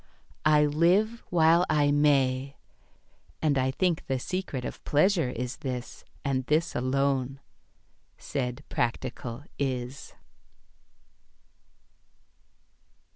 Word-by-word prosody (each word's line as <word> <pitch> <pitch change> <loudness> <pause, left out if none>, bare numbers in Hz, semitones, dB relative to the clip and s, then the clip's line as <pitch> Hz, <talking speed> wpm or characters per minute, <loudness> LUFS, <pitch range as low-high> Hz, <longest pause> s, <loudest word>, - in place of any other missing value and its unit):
I 150 -1 +5
live 180 +10 +2
while 165 0 +5
I 145 -2 +3
may, 140 -2 +2 0.8
"And 150 -3 +2
I 130 -1 +2
think 170 +4 0
the 135 - 0
secret 140 -3 -4
of - - -7
pleasure 160 -1 +2
is 125 +2 -4
this. 125 -3 -6 0.2
And 135 -2 0
this 155 +3 +1
alone," 135 +1 0 0.8
said 125 0 -4
practical 120 +1 -3 0.2
Is. 130 -1 -3
140 Hz, 90 wpm, -28 LUFS, 130-155 Hz, 0.8 s, I